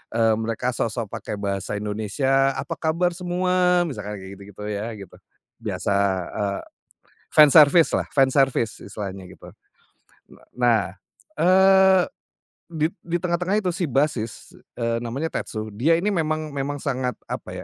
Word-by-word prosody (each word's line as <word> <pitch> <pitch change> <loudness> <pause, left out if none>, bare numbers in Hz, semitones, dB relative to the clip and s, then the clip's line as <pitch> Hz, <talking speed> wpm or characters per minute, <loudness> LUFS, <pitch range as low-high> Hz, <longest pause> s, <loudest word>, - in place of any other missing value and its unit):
eee, 115 -1 +3
mereka 115 +3 -2
sok-sok 115 -2 -3
pakai - - -5
bahasa 100 0 -3
Indonesia, 125 +7 0
"Apa - - -5
kabar 170 +2 +1
semua?" 180 0 +1
Misalkan 105 - -5
kayak 95 +1 -10
gitu-gitu 100 +1 -11
ya 105 +3 -3
gitu. 100 -3 -12 0.5
Biasa, 100 - -1 0.4
eee, 100 -2 -2 0.7
fans 150 -2 +7
service 155 +1 +7
lah, - - 0
fans 135 -2 +3
service 135 -5 +1
istilahnya 95 -2 -7
gitu. - - -13 0.8
Na - - -19
nah, 120 -4 +3 0.5
eee, 190 0 +5 0.7
di 155 -1 0 0.2
di 175 +1 -1
tengah-tengah 180 +3 0
itu 185 - -1
si 175 - -1
bassis, 120 -5 -2 0.2
eee, 115 0 0
namanya 135 +8 -3
Tetsu, 110 -1 -4
dia 160 +9 +3
ini 205 - -1
memang 155 -2 -1
memang 145 +1 -2
sangat, 130 -2 -1 0.2
apa - - -5
135 Hz, 140 wpm, -23 LUFS, 110-170 Hz, 0.8 s, fans